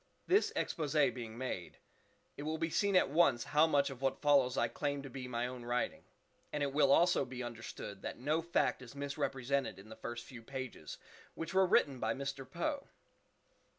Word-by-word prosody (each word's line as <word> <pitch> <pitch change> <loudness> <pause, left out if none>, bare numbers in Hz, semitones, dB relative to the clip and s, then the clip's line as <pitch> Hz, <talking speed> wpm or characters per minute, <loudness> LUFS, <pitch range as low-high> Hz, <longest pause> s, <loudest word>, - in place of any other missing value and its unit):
This 395 +4 +3
_exposé_being 140 -7 0
made, 115 -7 -5 0.6
it - - -7
will 155 +2 -2
be 165 0 -1
seen 200 +2 +2
at 180 - +4
once 140 -7 +4
how 155 +2 +4
much 140 -3 +2
of 130 -1 -9
what 135 -1 0
follows 140 -3 +4
I 120 - +3
claim 140 +4 -2
to 135 - -8
be 130 0 -6
my 120 -1 -1
own 125 -1 -6
writing; 120 +1 -1 0.5
and 150 - -1
it 140 -1 -1
will 140 -2 +4
also 175 0 +5
be 125 -1 -6
understood 115 -4 -7
that - - -5
no 150 +6 +1
fact 170 -5 +1
is 125 +1 -11
misrepresented 140 -4 -1
in 100 +3 -13
the 110 - -9
first 120 0 -6
few 125 -3 -10
pages 130 - -6 0.4
which 165 +2 -5
were 190 0 +5
written 140 -6 +3
by 110 0 0
Mr. 135 -1 -5
Poe. 275 - -2
135 Hz, 185 wpm, -35 LUFS, 120-150 Hz, 0.6 s, also